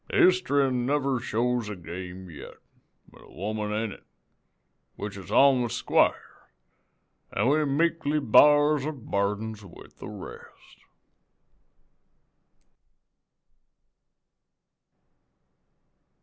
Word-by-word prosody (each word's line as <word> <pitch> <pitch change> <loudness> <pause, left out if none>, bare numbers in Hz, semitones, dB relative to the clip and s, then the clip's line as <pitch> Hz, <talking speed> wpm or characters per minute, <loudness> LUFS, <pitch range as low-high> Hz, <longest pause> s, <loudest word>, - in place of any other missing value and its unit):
Hist'ry 145 -7 +3
never 130 +1 0
shows 120 -1 -1
a 105 - -5
game 90 +1 -8
yet, 75 -3 -11 0.6
an' - - -17
a - - -18
woman 105 +4 -4
in 110 0 -2
it, - - -13 0.9
which 105 -1 -6
is 95 -2 -10
on 135 +3 +5
the 120 - -2
squar', - - -1 0.8
an' 105 +5 0
we 155 +2 +2
meekly 155 +1 0
b'ars 145 +3 +5
our 155 - -2
burdens 105 -3 -3
with 95 - -15
the - - -8
rest.'" - - -12
120 Hz, 90 wpm, -26 LUFS, 105-145 Hz, 0.9 s, on